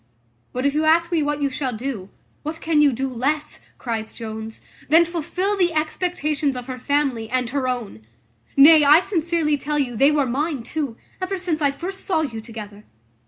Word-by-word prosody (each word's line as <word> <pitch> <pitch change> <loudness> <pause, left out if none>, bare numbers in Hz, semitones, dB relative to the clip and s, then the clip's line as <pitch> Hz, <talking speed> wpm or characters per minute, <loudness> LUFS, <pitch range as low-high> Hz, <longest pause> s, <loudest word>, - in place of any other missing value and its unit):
But 255 +2 -3
if 280 - +2
you 305 +1 +1
ask 335 +2 +3
me 335 -2 +2
what 295 0 -1
you 280 - +1
shall 255 -4 -3
do, 225 -6 -5 0.3
what 310 +2 -5
can 315 -2 +2
you 290 -2 +5
do 265 +2 -2
less," 280 +5 -2 0.2
cries 225 -3 -4
Jones, 220 0 -7 0.3
"than 330 +3 +6
fulfil 360 +4 -2
the 355 -3 +1
expectations 305 -3 -1
of 250 -1 -5
her 255 -1 -6
family, 265 -5 0
and 250 -1 -1
her 275 -1 -1
own? 230 - -4 0.5
Nay, 300 +2 +8
I 295 +3 +7
sincerely 335 -5 +1
tell 295 +1 -2
you, 255 -5 -1
they 275 +6 +5
were 295 -2 +2
mine 275 +1 -2
too, 280 -4 -4 0.2
ever 375 +1 -2
since 350 -4 -2
I 285 - +4
first 360 +7 -6
saw 340 -4 +1
you 235 -8 -4
together. 215 -2 -9
285 Hz, 190 wpm, -22 LUFS, 250-315 Hz, 0.5 s, Nay